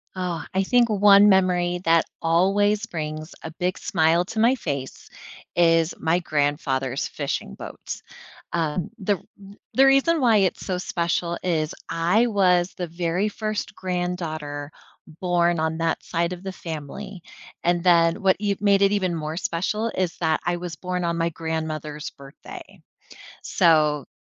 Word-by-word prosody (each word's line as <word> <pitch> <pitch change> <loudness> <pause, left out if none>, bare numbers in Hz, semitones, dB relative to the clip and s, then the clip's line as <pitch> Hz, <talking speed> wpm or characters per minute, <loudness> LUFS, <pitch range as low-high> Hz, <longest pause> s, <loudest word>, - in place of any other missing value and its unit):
Oh, 175 -4 -3
I 190 - +2
think 240 +3 +3
one 205 0 +6
memory 180 -2 +2
that 165 0 +4 0.2
always 200 +6 +2
brings 155 -4 -5
a 160 - -6
big 180 0 -1
smile 165 0 +2
to 220 +4 -5
my 240 +4 +4
face 140 - -5 0.5
is 165 -1 +3
my 165 +2 +1
grandfather's 145 -4 -1
fishing - - -4
boat. - - -8 0.5
Um, 170 +3 -1
the 205 0 +1 0.2
the 195 -1 -14
r - - -19 0.2
the 270 - +6
reason 275 +5 +4
why 235 -5 +4
it's 195 -3 0
so 185 -2 -1
special 170 -1 -1
is 160 -3 0 0.2
I 180 +8 +2
was 185 -4 +2
the 180 - -3
very 170 +4 -1
first 215 -1 -4
granddaughter 165 -5 -4 0.5
born 175 -2 +2
on 160 0 -1
that 165 0 -1
side 170 +1 -1
of 180 +1 -9
the 190 - -4
family, 175 +4 -7 0.4
and 175 0 +2
then 170 -2 +4
what 190 -1 +4
y 200 -1 +1
made 200 -1 +3
it 200 0 +4
even 185 -4 0
more 155 0 -4
special 190 +6 -1
is 185 -2 -1
that 160 -2 +1
I 175 0 0
was 175 -2 -6
born 180 +2 -3
on 170 0 -1
my 165 0 +1
grandmother's 155 -2 -4
birthday. 140 0 -12 0.6
So 150 -4 +3
175 Hz, 155 wpm, -24 LUFS, 160-195 Hz, 0.6 s, one